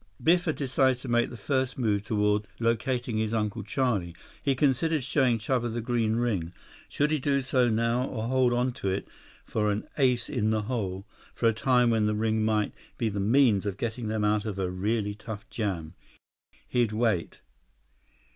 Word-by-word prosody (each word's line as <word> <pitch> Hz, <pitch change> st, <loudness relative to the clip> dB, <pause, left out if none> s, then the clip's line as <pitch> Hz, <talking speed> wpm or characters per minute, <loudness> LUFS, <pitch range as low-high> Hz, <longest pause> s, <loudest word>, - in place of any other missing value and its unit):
Biff 175 Hz, +2 st, +4 dB
had 160 Hz, -, 0 dB
decided 130 Hz, -1 st, +2 dB
to 135 Hz, -, -7 dB
make 120 Hz, 0 st, +2 dB
the 120 Hz, -, -9 dB
first 130 Hz, +3 st, -1 dB
move 105 Hz, -5 st, +1 dB
toward 105 Hz, -1 st, 0 dB
locating 115 Hz, 0 st, 0 dB
his 110 Hz, +1 st, 0 dB
Uncle 110 Hz, 0 st, -1 dB
Charlie. 105 Hz, -6 st, -1 dB, 0.3 s
He 135 Hz, -1 st, +1 dB
considered 145 Hz, +3 st, +1 dB
showing 125 Hz, -2 st, +2 dB
Chuba 120 Hz, +1 st, -1 dB
the 120 Hz, -, -3 dB
green 115 Hz, -2 st, 0 dB
ring. 100 Hz, -8 st, -1 dB, 0.4 s
Should 150 Hz, +1 st, 0 dB
he 155 Hz, -, +1 dB
do 140 Hz, 0 st, +1 dB
so 125 Hz, -2 st, +2 dB
now, 115 Hz, +3 st, +1 dB
or 110 Hz, -3 st, -4 dB
hold 130 Hz, -1 st, +3 dB
on 125 Hz, +1 st, +1 dB
to 100 Hz, -, 0 dB
it 95 Hz, +1 st, -2 dB, 0.4 s
for 105 Hz, -1 st, 0 dB
an 105 Hz, +1 st, -3 dB
ace 125 Hz, -3 st, +2 dB
in 110 Hz, -6 st, 0 dB
the 110 Hz, -1 st, +1 dB
hole, 100 Hz, -5 st, -3 dB, 0.3 s
for 115 Hz, -, +2 dB
a 115 Hz, -, +4 dB
time 125 Hz, +1 st, +3 dB
when 110 Hz, -2 st, +2 dB
the 105 Hz, -, 0 dB
ring 110 Hz, 0 st, +1 dB
might 110 Hz, -1 st, +1 dB, 0.2 s
be 115 Hz, -, 0 dB
the 100 Hz, -1 st, -3 dB
means 110 Hz, -1 st, +3 dB
of 100 Hz, -1 st, -3 dB
getting 115 Hz, 0 st, -3 dB
them 110 Hz, 0 st, -1 dB
out 105 Hz, 0 st, +2 dB
of 105 Hz, -3 st, -4 dB
a 95 Hz, -2 st, -1 dB
really 105 Hz, +3 st, -1 dB
tough 110 Hz, +2 st, -8 dB
jam. 90 Hz, -8 st, -3 dB, 0.7 s
He'd 120 Hz, -3 st, +1 dB
wait. 110 Hz, -6 st, 0 dB
115 Hz, 185 wpm, -28 LUFS, 105-125 Hz, 0.7 s, Biff